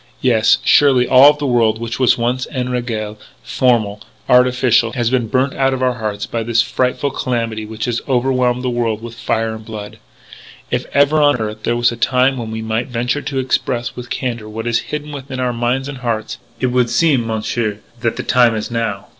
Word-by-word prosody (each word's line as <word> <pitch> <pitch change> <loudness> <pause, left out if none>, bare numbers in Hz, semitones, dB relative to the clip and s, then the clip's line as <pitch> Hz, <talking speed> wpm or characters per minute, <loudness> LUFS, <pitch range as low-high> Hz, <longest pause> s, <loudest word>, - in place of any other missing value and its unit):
Yes, 115 -4 +4
surely 130 -4 +5
all 135 +3 +7
the 145 -1 -5
world 115 -4 +2
which 115 +1 -5
was 130 -3 +4
once 125 +2 -1
en 125 -2 -3
régle, 115 -4 -3 0.3
formal, 110 -5 +1 0.3
artificial, 125 -2 +3
has 120 -2 0
been 125 -3 +1
burnt 130 +4 0
out 135 -1 +1
of 130 - -3
our 125 -1 +2
hearts 105 -3 -4
by 115 - -3
this 115 0 -2
so 115 - +5
frightful 130 +2 0
calamity 115 -4 -3
which 110 0 -5
has 120 -1 -2
overwhelmed 125 -1 +1
the 125 - 0
world 115 -2 -1
with 120 -1 -7
fire 115 -1 -2
and 110 0 -9
blood. 105 -2 -8 0.7
"If - - -1
ever 145 +2 +3
on 145 -1 +4
earth 110 -1 -5
there 120 - 0
was 120 0 +3
a 120 - -7
time 130 +2 +2
when 115 -2 -5
we 110 0 -5
might 110 +3 -2
venture 125 +3 -2
to 140 -1 -4
express 130 -2 -1
with 120 0 -8
candour 120 -4 -4
what 110 +1 -6
is 120 -1 +1
hidden 150 0 -5
within 135 -2 -7
our 125 -1 0
minds 120 +3 -1
and 140 -3 -7
hearts, 115 -3 -3 0.2
it 130 -1 0
would 125 -1 +2
seem, 120 -1 +2
Monsieur, 110 -1 -2 0.2
that 115 -1 -1
the - - -4
time 120 -2 +3
is 110 +2 -4
now. 115 -4 -2
120 Hz, 205 wpm, -17 LUFS, 115-130 Hz, 0.7 s, all